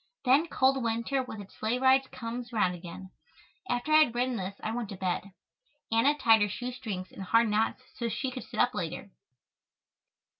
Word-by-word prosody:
Then 275 Hz, +6 st, +5 dB
cold 265 Hz, -3 st, +2 dB
winter 235 Hz, +3 st, 0 dB
with 235 Hz, -4 st, -7 dB
its 200 Hz, -, -13 dB
sleigh 225 Hz, +3 st, -1 dB
rides 265 Hz, +1 st, +4 dB
comes 235 Hz, 0 st, -6 dB
round 205 Hz, -6 st, +2 dB
again." 180 Hz, +2 st, -9 dB, 0.6 s
After 245 Hz, +6 st, 0 dB
I -, -, +9 dB
had 235 Hz, -, -9 dB
written 250 Hz, +1 st, 0 dB
this 195 Hz, -1 st, -5 dB
I 215 Hz, -, -1 dB
went 230 Hz, -2 st, -3 dB
to 195 Hz, -, -6 dB
bed. 185 Hz, +1 st, -2 dB, 0.6 s
Anna 270 Hz, +7 st, +3 dB
tied 225 Hz, -6 st, +5 dB
her 205 Hz, -, +2 dB
shoe 245 Hz, +5 st, -4 dB
strings 210 Hz, -7 st, -6 dB
in -, -, -10 dB
hard 230 Hz, +4 st, +3 dB
knots 220 Hz, +4 st, 0 dB
so 235 Hz, -1 st, -3 dB
she 260 Hz, +3 st, -2 dB
could 255 Hz, 0 st, -6 dB
sit -, -, -7 dB
up 245 Hz, -, +3 dB
later. 175 Hz, +1 st, -5 dB
230 Hz, 190 wpm, -29 LUFS, 200-255 Hz, 0.6 s, I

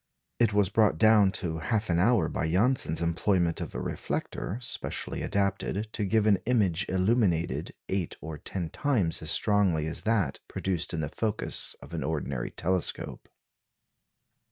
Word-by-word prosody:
It 115 Hz, -3 st, +4 dB
was 100 Hz, -2 st, +3 dB
brought 105 Hz, -5 st, +3 dB
down 105 Hz, -1 st, +6 dB
to 85 Hz, -4 st, -2 dB
half 110 Hz, +6 st, -1 dB
an 85 Hz, -1 st, +2 dB
hour 105 Hz, -3 st, +4 dB
by 80 Hz, -, -2 dB
Janssen's 95 Hz, -3 st, +1 dB
employment 85 Hz, +1 st, +1 dB
of -, -, -6 dB
a -, -, -2 dB
reflector 100 Hz, -, -3 dB
specially 120 Hz, -, -4 dB
adapted 100 Hz, +2 st, -1 dB
to 105 Hz, -, -1 dB
give 110 Hz, +2 st, +2 dB
an 100 Hz, -3 st, +4 dB
image 100 Hz, -8 st, +2 dB
illuminated 95 Hz, -3 st, +1 dB
eight 95 Hz, -3 st, -2 dB
or 80 Hz, -1 st, -7 dB
ten 85 Hz, 0 st, -4 dB
times 115 Hz, -, +1 dB
as 80 Hz, -, -4 dB
strongly 95 Hz, -6 st, +2 dB
as 80 Hz, -, -3 dB
that 110 Hz, -3 st, 0 dB
produced 90 Hz, -3 st, -2 dB
in 80 Hz, -, -2 dB
the 75 Hz, -, -2 dB
focus 110 Hz, +4 st, -1 dB
of -, -, -12 dB
an -, -, -2 dB
ordinary 70 Hz, -5 st, -2 dB
telescope. 90 Hz, +1 st, -2 dB
95 Hz, 155 wpm, -28 LUFS, 80-105 Hz, -, down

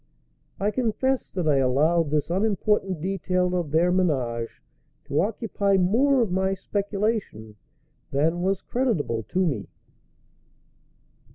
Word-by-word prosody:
I 205 Hz, +2 st, +1 dB
confess 255 Hz, +3 st, 0 dB
that 180 Hz, -4 st, -3 dB
I 145 Hz, -2 st, +4 dB
allowed 150 Hz, +5 st, +2 dB
this 150 Hz, +1 st, 0 dB
unimportant 195 Hz, -2 st, 0 dB
detail 180 Hz, 0 st, 0 dB
of 175 Hz, -4 st, -1 dB
their 165 Hz, +4 st, +3 dB
ménage 130 Hz, -11 st, 0 dB, 0.6 s
to 145 Hz, -, +1 dB
occupy 200 Hz, -1 st, 0 dB
more 240 Hz, +8 st, +3 dB
of 210 Hz, -, -3 dB
my 190 Hz, +1 st, +1 dB
speculation 200 Hz, -, -3 dB, 0.5 s
than 160 Hz, +5 st, +1 dB
was 190 Hz, +1 st, 0 dB
creditable 195 Hz, -, -1 dB
to 185 Hz, -, -1 dB
me. 125 Hz, -, -2 dB
180 Hz, 115 wpm, -25 LUFS, 150-205 Hz, 0.6 s, I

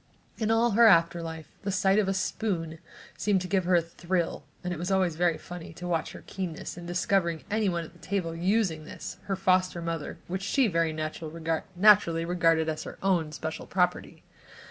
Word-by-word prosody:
In 220 Hz, -1 st, 0 dB
all 230 Hz, +1 st, +3 dB
her 230 Hz, +3 st, +6 dB
after 170 Hz, -3 st, +4 dB
life, 160 Hz, -2 st, -6 dB
the 200 Hz, -, -2 dB
sight 195 Hz, +1 st, +3 dB
of 205 Hz, -, +1 dB
a 195 Hz, -, +1 dB
spoon 170 Hz, -5 st, -2 dB, 0.4 s
seemed 205 Hz, -2 st, +1 dB
to 185 Hz, -, -4 dB
give 190 Hz, -1 st, +1 dB
her 180 Hz, 0 st, +3 dB
a 170 Hz, -, +4 dB
thrill 170 Hz, +1 st, -2 dB, 0.2 s
and 180 Hz, 0 st, -2 dB
it 165 Hz, -, -6 dB
was 175 Hz, +2 st, -3 dB
always 185 Hz, -4 st, +2 dB
very 170 Hz, -1 st, +2 dB
funny 175 Hz, -2 st, -9 dB
to 175 Hz, +2 st, -7 dB
watch 165 Hz, -3 st, -1 dB
her -, -, -11 dB
keenness 180 Hz, -5 st, -5 dB
in 175 Hz, 0 st, -9 dB
discovering 175 Hz, -2 st, 0 dB
anyone 195 Hz, -6 st, +1 dB
at 165 Hz, -, -12 dB
the 175 Hz, -, -20 dB
table 165 Hz, -1 st, -2 dB
using 175 Hz, -3 st, 0 dB
this, -, -, -8 dB
her 195 Hz, -, -1 dB
foster 185 Hz, -1 st, +2 dB
mother, 165 Hz, -3 st, -4 dB
which 185 Hz, +2 st, -3 dB
she, 245 Hz, +6 st, +2 dB
very 165 Hz, -4 st, +1 dB
naturally, 165 Hz, +3 st, +2 dB
regarded 165 Hz, -2 st, +2 dB
as 155 Hz, -1 st, -2 dB
her -, -, -8 dB
own 175 Hz, -5 st, +1 dB
special 160 Hz, +1 st, -5 dB
property. 180 Hz, -1 st, -1 dB
175 Hz, 190 wpm, -28 LUFS, 165-195 Hz, 0.4 s, her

